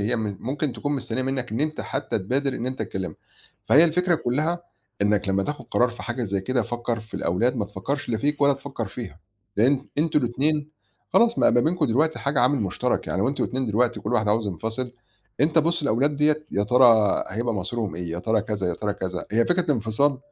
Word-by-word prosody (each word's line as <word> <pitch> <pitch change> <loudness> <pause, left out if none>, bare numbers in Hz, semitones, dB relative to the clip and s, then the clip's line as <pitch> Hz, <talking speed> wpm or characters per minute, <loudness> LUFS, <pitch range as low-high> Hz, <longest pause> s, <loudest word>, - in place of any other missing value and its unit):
هي 115 +4 +1
م 105 -3 -3
ممكن 140 +2 -2
تكون 145 - -3
مستنّية 130 -1 -2
منّك 130 -2 -2
إن 115 - -1
أنت 155 0 -1
حتّى - - -2
تبادِر 130 +7 -1
إن 120 - -4
أنت 130 -3 -2
تكلِّمها. 95 -3 -5 0.5
فهي 155 +5 +7
الفكرة 175 +2 +2
كُلّها 155 +5 -1 0.4
إنَّك 105 -1 +2
لمّا 95 0 +2
تاخُد 145 +2 -4
قرار 125 - +3
في 120 - -9
حاجة 120 +2 -3
زي 100 -1 -1
كده 125 +5 0
فكّر 120 +1 -3
في 110 0 -15
الأولاد 115 +9 0
ما 105 - 0
تفكّرش 105 +9 -4
لا 115 - 0
فيك 145 +4 -1
ولا 140 0 +5
تفكّر 140 0 -5
فيها، 80 +5 -8 0.4
لإن 135 +5 +3
أنتم 155 0 +3
الاتنين 145 +4 0 0.4
خلاص 235 0 +4
ما - - +5
بقى 120 - +3
بينكم 165 0 +1
دلوقتي 155 +7 +1
حاجة 140 -1 0
عامل 130 +3 +3
مُشترَك. 105 +6 -1
يعني 95 - -1
لو 115 - +2
أنتم 140 - -1
الاتنين 130 0 -2
دلوقتي 120 +3 +1
وكل - - -3
واحد 110 -3 +2
عاوز 110 0 +2
ينفصِل، 115 +7 -4 0.5
أنت 155 +3 +3
بُص 165 0 +2
للأولاد 140 +3 +1
ديّة 150 +1 +2
يا 100 - +1
ترى 115 -2 +5
هيبقى 115 +3 -2
مصيرهم 105 -1 -3
إيه؟ 85 -1 -5
يا 85 - -3
ترى 110 +4 +1
كذا، 105 -4 -2
يا 85 - -1
ترى 105 +2 -2
كذا. 95 -3 -4
هي 115 +1 +4
فكرة 180 +1 +3
الانفصال 135 - +1
120 Hz, 215 wpm, -24 LUFS, 105-145 Hz, 0.5 s, فهي